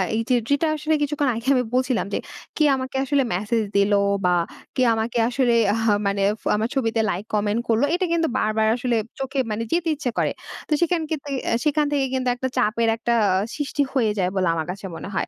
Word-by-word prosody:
এইযে 230 Hz, +3 st, +1 dB
যেটা 285 Hz, +3 st, +2 dB
আসলে 310 Hz, +1 st, -1 dB
কিছুক্ষণ 290 Hz, 0 st, 0 dB
আগে 230 Hz, +3 st, -6 dB
আমি 250 Hz, -, +2 dB
বলছিলাম, 255 Hz, -1 st, +1 dB
যে, -, -, +1 dB, 0.4 s
কে 310 Hz, -, +3 dB
আমাকে 260 Hz, 0 st, -5 dB
আসলে 275 Hz, 0 st, +2 dB
মেসেজ 215 Hz, +5 st, 0 dB
দিল 200 Hz, +1 st, +3 dB, 0.3 s
বা 180 Hz, -, +4 dB, 0.4 s
কে 255 Hz, -, 0 dB
আমাকে 225 Hz, +2 st, -2 dB
আসলে 250 Hz, -1 st, +2 dB, 0.2 s
আহ 225 Hz, 0 st, -1 dB, 0.2 s
মানে 200 Hz, 0 st, 0 dB, 0.2 s
ফ -, -, -28 dB
আমার 220 Hz, +2 st, 0 dB
ছবিতে 230 Hz, -4 st, 0 dB
লাইক, 185 Hz, +2 st, -2 dB
কমেন্ট 210 Hz, +1 st, +1 dB
করল 225 Hz, +1 st, +2 dB
এটা 370 Hz, -, 0 dB
কিন্তু 330 Hz, -1 st, +2 dB
বারবার 220 Hz, 0 st, +1 dB
আসলে 245 Hz, -1 st, -1 dB, 0.2 s
চোখে 270 Hz, +1 st, -2 dB
মানে 215 Hz, +2 st, -2 dB
যেতে 340 Hz, -1 st, +1 dB
ইচ্ছা 275 Hz, -4 st, -3 dB
করে। -, -, +1 dB, 0.4 s
তো -, -, -20 dB
সেখান 345 Hz, -1 st, +2 dB
থেকে 295 Hz, -2 st, -4 dB, 0.2 s
অ্যা -, -, +2 dB
সেখান 300 Hz, 0 st, +2 dB
থেকে 280 Hz, -2 st, +1 dB
কিন্তু 260 Hz, -1 st, -1 dB
একটা 260 Hz, +1 st, -2 dB
চাপের 230 Hz, 0 st, +2 dB
একটা 235 Hz, +1 st, 0 dB, 0.2 s
আ -, -, +2 dB, 0.2 s
সৃষ্টি 290 Hz, -1 st, -2 dB
হয়ে 230 Hz, -6 st, +2 dB
যায় 180 Hz, -1 st, +1 dB
বলে 185 Hz, -2 st, +1 dB
আমার 160 Hz, -1 st, -2 dB
কাছে 195 Hz, +2 st, -8 dB
মনে 195 Hz, -, -7 dB
হয়। -, -, -1 dB
245 Hz, 210 wpm, -23 LUFS, 220-280 Hz, 0.4 s, বা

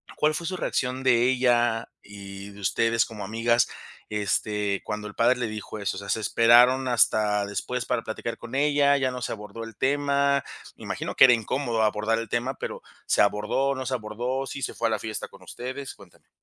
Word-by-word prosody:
¿cuál 155 Hz, 0 st, +2 dB
fue 170 Hz, +2 st, -4 dB
su 185 Hz, -, -3 dB
reacción 130 Hz, -5 st, -2 dB
de 120 Hz, -2 st, +4 dB
ella 120 Hz, -3 st, +2 dB
y 100 Hz, 0 st, -9 dB
de 100 Hz, -, -14 dB
ustedes 115 Hz, +4 st, +2 dB
como 105 Hz, -3 st, -8 dB
amigas, 115 Hz, +3 st, +2 dB, 0.4 s
este, 105 Hz, 0 st, -1 dB
cuando 105 Hz, 0 st, -4 dB
el 105 Hz, -, -9 dB
padre 120 Hz, +3 st, +3 dB
le 120 Hz, -, -2 dB
dijo 110 Hz, 0 st, -6 dB
eso, 100 Hz, -1 st, -2 dB
o -, -, -4 dB
sea, 100 Hz, -, -9 dB
se -, -, +1 dB
esperaron 120 Hz, +4 st, +5 dB
hasta 105 Hz, -3 st, +2 dB
después 120 Hz, +4 st, -3 dB
para -, -, 0 dB
platicar 115 Hz, +1 st, -5 dB
con 120 Hz, +2 st, -8 dB
ella, 145 Hz, 0 st, +3 dB
ya 130 Hz, -2 st, 0 dB
no 125 Hz, 0 st, -6 dB
se -, -, -3 dB
abordó 105 Hz, +1 st, -7 dB
el 115 Hz, -2 st, -9 dB
tema?, 140 Hz, 0 st, +2 dB, 0.3 s
me -, -, -14 dB
imagino -, -, -4 dB
que -, -, +7 dB
era 125 Hz, -, +7 dB
incómodo 115 Hz, 0 st, -1 dB
abordar 110 Hz, +1 st, +1 dB
el 115 Hz, -2 st, -6 dB
tema 120 Hz, +4 st, -1 dB
pero, -, -, -6 dB, 0.3 s
¿se -, -, +3 dB
abordó, 105 Hz, +7 st, +1 dB
no 130 Hz, 0 st, -5 dB
se 130 Hz, -, -2 dB
abordó, 120 Hz, +4 st, -3 dB
sí 140 Hz, -, -6 dB
se -, -, -2 dB
fue 115 Hz, -, 0 dB
a -, -, -1 dB
la 110 Hz, -, 0 dB
fiesta 110 Hz, -1 st, -5 dB
con -, -, -17 dB
ustedes?, 130 Hz, +2 st, -7 dB
cuéntame. -, -, -19 dB
115 Hz, 210 wpm, -26 LUFS, 105-130 Hz, 0.4 s, que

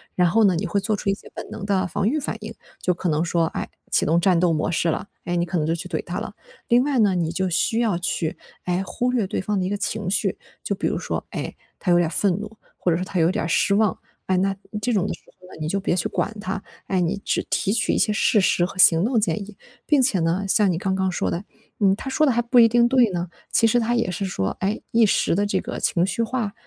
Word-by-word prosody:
然 180 Hz, -1 st, +3 dB
后 225 Hz, +5 st, +3 dB
呢， 195 Hz, -3 st, +5 dB
你 195 Hz, +4 st, -2 dB
会 200 Hz, +3 st, 0 dB
做 210 Hz, +2 st, -1 dB
出 200 Hz, -, -2 dB
一 -, -, +3 dB
些 -, -, -11 dB
本 -, -, -8 dB
能 200 Hz, -, -7 dB
的 195 Hz, -2 st, +1 dB
防 195 Hz, +4 st, -1 dB
御 305 Hz, +5 st, 0 dB
反 285 Hz, -, -3 dB
应， -, -, -7 dB, 0.3 s
就 180 Hz, -, +1 dB
可 175 Hz, +1 st, -4 dB
能 155 Hz, 0 st, +1 dB
说， 170 Hz, 0 st, +1 dB
哎， 160 Hz, -, -4 dB, 0.2 s
启 -, -, +2 dB
动 165 Hz, +2 st, +3 dB
战 180 Hz, 0 st, +3 dB
斗 175 Hz, 0 st, +3 dB
模 155 Hz, -1 st, 0 dB
式 170 Hz, 0 st, +1 dB
了， 185 Hz, +5 st, -2 dB, 0.2 s
哎， 175 Hz, 0 st, -2 dB
你 170 Hz, -, +1 dB
可 175 Hz, +1 st, -2 dB
能 155 Hz, -, 0 dB
就 160 Hz, -, +1 dB
去 170 Hz, +2 st, -5 dB
怼 165 Hz, -3 st, -3 dB
他 180 Hz, +3 st, -4 dB
了。 215 Hz, -1 st, -7 dB, 0.3 s
另 240 Hz, +1 st, +4 dB
外 275 Hz, -3 st, 0 dB
呢， 200 Hz, -4 st, +3 dB
你 165 Hz, -2 st, 0 dB
就 185 Hz, +2 st, -1 dB
需 205 Hz, +6 st, +1 dB
要 220 Hz, -7 st, +1 dB
去， 170 Hz, -2 st, -2 dB, 0.3 s
哎， 180 Hz, +1 st, -1 dB
忽 245 Hz, +5 st, -1 dB
略 235 Hz, -5 st, +1 dB
对 185 Hz, -, -3 dB
方 205 Hz, +2 st, -1 dB
的 185 Hz, -, 0 dB
一 -, -, -1 dB
个 205 Hz, -, -1 dB
情 205 Hz, -1 st, -3 dB
绪， 195 Hz, -, 0 dB, 0.2 s
就 -, -, -2 dB
比 -, -, -4 dB
如 -, -, 0 dB
说， -, -, -4 dB
哎， -, -, -5 dB, 0.2 s
他 185 Hz, -, -3 dB
有 175 Hz, -, +5 dB
点 175 Hz, -2 st, +2 dB
儿 -, -, -10 dB
愤 200 Hz, -3 st, +3 dB
怒， 215 Hz, +1 st, -9 dB, 0.2 s
或 180 Hz, -, 0 dB
者 165 Hz, -, +2 dB
说 180 Hz, -, -3 dB
他 185 Hz, -, -5 dB
有 165 Hz, +2 st, +3 dB
点 175 Hz, -, -2 dB
儿 -, -, -2 dB
失 185 Hz, +4 st, +2 dB
望， 210 Hz, -1 st, +2 dB, 0.3 s
哎， 190 Hz, -, +1 dB
那 195 Hz, +2 st, +1 dB, 0.3 s
这 245 Hz, -, 0 dB
种 200 Hz, -2 st, +1 dB
的 -, -, -2 dB
时 -, -, -12 dB, 0.2 s
候 180 Hz, -, -16 dB
呢， -, -, -12 dB
你 155 Hz, -, -2 dB
就 200 Hz, -, 0 dB
别 190 Hz, -, 0 dB
去 175 Hz, -, 0 dB
管 220 Hz, -, -2 dB
它， 195 Hz, 0 st, -3 dB, 0.3 s
哎， 190 Hz, -2 st, 0 dB
你 180 Hz, +3 st, 0 dB
只 -, -, 0 dB
提 195 Hz, -, 0 dB
取 225 Hz, +1 st, +1 dB
一 -, -, +1 dB
些 215 Hz, -, +2 dB
事 210 Hz, 0 st, +3 dB
实 175 Hz, -1 st, +2 dB
和 190 Hz, -, -8 dB
行 170 Hz, -1 st, +6 dB
动 245 Hz, +1 st, +1 dB
建 215 Hz, -, 0 dB
议。 200 Hz, +1 st, -9 dB, 0.3 s
并 295 Hz, -3 st, +3 dB
且 245 Hz, -7 st, +3 dB
呢， 165 Hz, +4 st, 0 dB
像 210 Hz, -1 st, +4 dB
你 175 Hz, -, 0 dB
刚 190 Hz, +2 st, -1 dB
刚 190 Hz, 0 st, 0 dB
说 -, -, -1 dB
的， 170 Hz, +3 st, -3 dB, 0.4 s
嗯， 195 Hz, -3 st, +4 dB
他 265 Hz, -, -6 dB
说 305 Hz, +3 st, +2 dB
的 275 Hz, -, +3 dB
还 240 Hz, 0 st, +1 dB
不 240 Hz, +1 st, 0 dB
一 230 Hz, -, +8 dB
定 235 Hz, +1 st, +4 dB
对 250 Hz, -3 st, +4 dB
呢， 175 Hz, -1 st, -3 dB, 0.2 s
其 230 Hz, -, +4 dB
实 225 Hz, -, +3 dB
他 235 Hz, +1 st, 0 dB
也 235 Hz, -5 st, 0 dB
是 180 Hz, +3 st, -3 dB
说， 95 Hz, -, -2 dB
哎， 200 Hz, +3 st, 0 dB
一 230 Hz, 0 st, +5 dB
时 195 Hz, -, +2 dB
的 205 Hz, +2 st, +1 dB
这 205 Hz, -, 0 dB
个 -, -, -5 dB
情 175 Hz, -1 st, +1 dB
绪 230 Hz, +4 st, -1 dB
化， 225 Hz, -3 st, -2 dB
195 Hz, 310 characters per minute, -23 LUFS, 175-215 Hz, 0.4 s, 一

